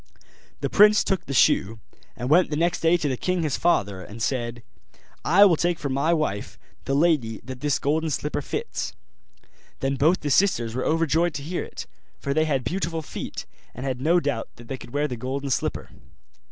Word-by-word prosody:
The - - 0
prince 210 +1 +6
took 190 -3 -1
the - - -5
shoe, 115 -4 +3 0.4
and 125 +1 -4
went 170 +6 +4
the 150 - -2
next 170 +3 +1
day 165 +2 +4
to 155 - -2
the 130 - 0
king 180 +6 -1
his 150 -4 0
father, 100 - +1
and 105 +5 -10
said, 120 0 -2 0.6
'I 195 +5 +6
will 180 -4 +5
take 175 +1 0
for 140 - -4
my 140 +5 +1
wife 155 -12 -1 0.3
the 135 - 0
lady 145 -8 +2
that 130 -1 -8
this 145 +1 +1
golden 155 +3 0
slipper 150 0 -2
fits.' - - -4 0.9
Then 135 0 -1
both 160 +7 +3
the 145 - -2
sisters 130 - +2
were 130 - -2
overjoyed 165 +1 +1
to 140 - -4
hear 175 +4 -3
it; - - -8 0.3
for 140 - -2
they 155 +2 +2
had 140 -4 0
beautiful 165 +3 -2
feet, - - -6 0.3
and 125 - -6
had 130 -2 -3
no 170 +5 +4
doubt 140 -7 -2
that 120 - -14
they 135 - -3
could - - -11
wear 145 +2 0
the 125 -4 -5
golden 135 +3 -3
slipper. - - -2
145 Hz, 200 wpm, -24 LUFS, 130-165 Hz, 0.9 s, prince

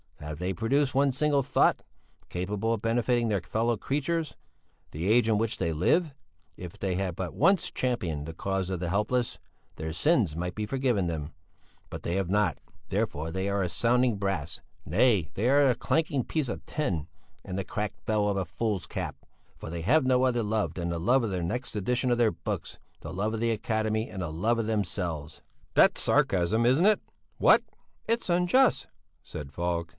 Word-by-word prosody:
Have 75 0 -7
they 90 +2 -1
produced 130 - +1
one 140 0 +4
single 140 +1 +2
thought, 130 - +2 0.5
capable 100 +5 -1
of 110 - -3
benefiting 120 +1 +1
their 100 -4 0
fellow 115 +5 0
creatures; 150 +7 -2 0.6
the 85 +6 -2
age 120 0 +4
in 110 -2 +3
which 115 0 -1
they 85 - -1
live? 150 - +2 0.4
If 90 -2 -9
they 95 -2 -1
had 95 -2 -2
but 90 -1 -4
once 195 -2 +3
championed 90 - -2
the 80 - -6
cause 95 +2 -2
of 95 -2 -2
the 90 -1 -2
helpless, 105 +6 0 0.4
their 80 0 -4
sins 95 - +2
might 90 +1 -3
be 105 - -2
forgiven 125 -6 0
them; 80 -2 -4 0.6
but - - -7
they 85 - -1
have 95 -2 -1
not. 105 +2 +2 0.3
Therefore 75 +3 -1
they 95 +3 -2
are 100 0 0
as 90 -3 -1
sounding 120 0 +3
brass 95 -6 -3 0.2
nay, 100 - +3
they 115 +6 0
are 140 +2 +5
as 135 -3 +5
a - - -14
clanking 155 -5 0
piece 150 -2 -2
of - - -5
tin 90 - -2 0.4
and 95 - -5
the 95 - -3
cracked 105 -1 -4
bell 105 -1 +1
of 100 -1 0
a 95 - -1
fool's 95 +2 -2
cap - - -4 0.4
for - - -8
they 85 0 -4
have 130 - +3
no 130 0 +3
other 120 -3 +2
love 110 0 -1
than 85 -1 -3
the 85 -1 -2
love 120 +9 +3
of 115 - -1
the 90 -3 -2
next 125 +8 -3
edition 125 +5 0
of 120 - +2
their 115 -2 +3
books, - - -5 0.2
the - - -7
love 105 +4 -1
of 110 - -2
the 115 0 +1
Academy 110 0 -1
and 95 - -6
the 80 - -4
love 110 +9 +1
of 115 - -1
themselves.'" 85 -8 -3 0.3
"That's - - +5
sarcasm, 100 +5 +2
isn't 130 +9 +4
it? 215 - +4 0.4
What?" - - +5 0.4
"It's 230 -3 0
unjust," 180 +10 +3 0.4
said 75 -3 -8
Falk. 85 +2 -2
105 Hz, 195 wpm, -28 LUFS, 90-125 Hz, 0.6 s, are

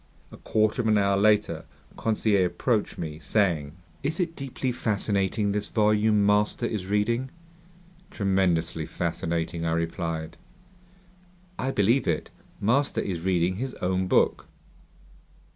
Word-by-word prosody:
A - - -11
quarter 110 +3 +1
of 115 - -1
an 110 -1 +4
hour 100 -1 +3
later, 105 +1 +2 0.3
Conseil 105 -3 +1
approached 110 +3 -1
me, 80 -2 -5
saying: 80 -4 0 0.3
"Is 155 +5 -2
it 170 -2 -1
deeply 135 -1 -3
fascinating, 105 -2 0
this 105 0 -2
volume 105 -1 +3
master 105 +3 +2
is 105 -5 -3
reading?" 115 +6 0 0.8
"Tremendously 90 - 0
fascinating," 85 0 -2
I 80 0 0
replied. 85 -1 -3 1.2
"I 130 - -1
believe 115 +2 +2
it. - - -1 0.3
Master 135 +7 +1
is 90 -4 -3
reading 90 0 +1
his 130 +3 -4
own 95 +1 -1
book!" - - +2
105 Hz, 125 wpm, -26 LUFS, 90-110 Hz, 1.2 s, an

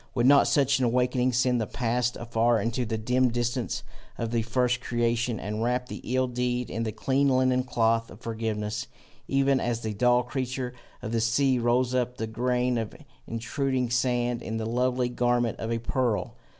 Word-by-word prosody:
would 120 -1 +2
not 140 +1 +6
such 140 -1 +3
an 130 - +2
awaking 125 +1 +2
send 125 0 +2
the 110 - -2
past 120 0 -1
afar 120 0 +1
into 115 +4 -1
the 110 0 -2
dim 125 +3 +2
distance 120 +1 -2 0.3
of 115 -1 -3
the 115 -1 +1
first 120 +1 0
creation, 120 -2 0
and 105 +2 -4
wrap 125 +1 0
the - - -6
ill 130 0 +3
deed 125 0 -2
in 115 - -3
the 110 -1 -1
clean 135 +5 +1
linen 130 -1 +3
cloth 115 -2 +1
of - - -12
forgiveness, 110 -2 -3 0.4
even 135 0 +2
as 120 -2 -1
the 110 -2 -3
dull 125 +3 +3
creature 125 0 -3 0.3
of 110 - -4
the 115 -1 +1
sea 125 +3 +2
rolls 120 +1 +2
up 125 -1 0
the 110 - -2
grain 125 +2 0
of 110 -2 -5 0.3
intruding 125 +2 -1
sand 120 -1 +1
in 110 - -4
the 110 - -3
lovely 125 +2 +1
garment 120 -1 0
of 115 - -3
a 115 - +1
pearl? 115 -1 -1
120 Hz, 185 wpm, -27 LUFS, 115-125 Hz, 0.4 s, not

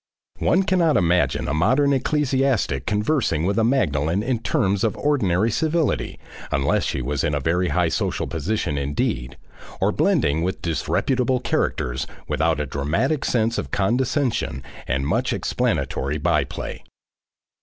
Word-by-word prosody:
One 185 +3 +3
cannot 175 -5 +2
imagine 90 -1 +1
a 65 - -1
modern 135 - +3
ecclesiastic 135 - 0
conversing 105 - +1
with 100 +4 +1
a - - +3
Magdalen 90 - +1
in 125 -1 0
terms 100 -2 0
of 110 - 0
ordinary 110 -8 +1
civility, 160 +6 0 0.3
unless 70 0 +1
she 65 - -2
was 70 +2 -1
in 75 -3 0
a - - 0
very 90 +6 +1
high 90 -1 +1
social - - -1
position 80 -2 -2
indeed, 65 -2 -2 0.4
or - - +2
blending 75 +3 +2
with 90 +3 -2
disreputable 125 - 0
characters 65 - -1 0.2
without 80 -1 +1
a 75 - -1
dramatic 85 - -1
sense 115 0 +1
of - - -5
condescension 120 - 0 0.2
and 65 +2 -1
much - - 0
explanatory 70 +3 -1
by - - +1
play. - - -7
95 Hz, 140 wpm, -22 LUFS, -, 0.4 s, One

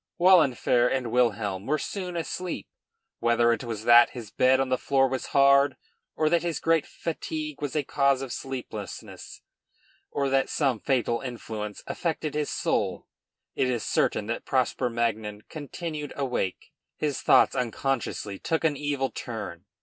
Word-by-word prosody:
Wahlenfer 145 -9 +5
and 125 -3 -1
Wilhelm 105 -5 +1
were 155 +2 +2
soon 180 +2 -4
asleep. 175 +2 -4 0.5
Whether 120 0 +3
it 115 - -4
was 115 -3 -5
that 120 +1 +7
his 115 -4 -8
bed 130 +1 +4
on 135 -1 0
the 130 - +2
floor 135 -1 +3
was 130 -1 -3
hard, 140 0 +4 0.4
or 155 - +1
that 170 +1 +3
his 170 -3 -2
great 165 -1 +2
fatigue 155 -2 -5
was 145 -1 -3
a 150 - +1
cause 140 0 +2
of 130 - -5
sleeplessness, 125 -7 -7 0.7
or 140 -1 -1
that 135 0 +2
some 135 -7 +1
fatal 120 -2 0
influence 110 -5 -6
affected 160 -3 -2
his 150 -1 -1
soul, - - -1 0.5
it 130 - +1
is 120 -3 -1
certain 105 - +1
that 115 +2 -3
Prosper 130 -1 0
Magnan 110 -3 -2
continued 150 0 -6
awake. 125 -9 -2 0.3
His 145 -3 -2
thoughts - - +5
unconsciously 120 -5 -2
took 165 0 -1
an 155 -2 +2
evil 140 -2 -1
turn. 105 -7 -6
130 Hz, 150 wpm, -27 LUFS, 115-150 Hz, 0.7 s, that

